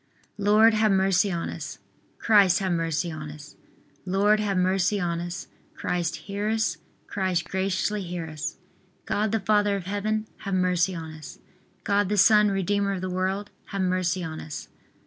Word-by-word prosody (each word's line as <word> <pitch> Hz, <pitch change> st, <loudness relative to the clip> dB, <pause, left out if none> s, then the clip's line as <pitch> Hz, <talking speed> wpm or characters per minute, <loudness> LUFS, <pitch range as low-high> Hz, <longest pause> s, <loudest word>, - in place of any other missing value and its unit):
Lord, 215 Hz, +3 st, +5 dB
have 215 Hz, -1 st, +3 dB
mercy 190 Hz, 0 st, +3 dB
on 170 Hz, -1 st, -2 dB
us. -, -, -7 dB, 0.4 s
Christ, 200 Hz, -5 st, +5 dB
have 190 Hz, -2 st, -1 dB
mercy 165 Hz, 0 st, -1 dB
on 155 Hz, -1 st, -6 dB
us. 150 Hz, 0 st, -11 dB, 0.5 s
Lord, 200 Hz, +3 st, +3 dB
have 200 Hz, -3 st, 0 dB
mercy 185 Hz, +2 st, +2 dB
on 170 Hz, -2 st, -1 dB
us. 175 Hz, +2 st, -5 dB, 0.3 s
Christ, 175 Hz, -3 st, -1 dB
hear 205 Hz, +1 st, -2 dB
us. 220 Hz, -7 st, 0 dB, 0.3 s
Christ, 185 Hz, -3 st, -1 dB
graciously 195 Hz, +2 st, -1 dB
hear 175 Hz, -2 st, -4 dB
us. 155 Hz, -1 st, -5 dB, 0.5 s
God 210 Hz, 0 st, 0 dB
the 225 Hz, -, +1 dB
Father 205 Hz, 0 st, +2 dB
of 195 Hz, -3 st, -5 dB
Heaven, 215 Hz, +2 st, -1 dB
have 195 Hz, -2 st, -3 dB
mercy 180 Hz, 0 st, +2 dB
on 160 Hz, -1 st, -6 dB
us. 155 Hz, -1 st, -10 dB, 0.5 s
God 205 Hz, -2 st, +1 dB
the 210 Hz, -, 0 dB
Son, 210 Hz, +1 st, +6 dB
Redeemer 200 Hz, +1 st, 0 dB
of 185 Hz, -, -4 dB
the 185 Hz, 0 st, -3 dB
world, 190 Hz, +3 st, -2 dB
have 195 Hz, -1 st, -4 dB
mercy 185 Hz, 0 st, 0 dB
on 160 Hz, -1 st, -5 dB
us. 150 Hz, -, -7 dB
190 Hz, 165 wpm, -26 LUFS, 175-205 Hz, 0.5 s, Son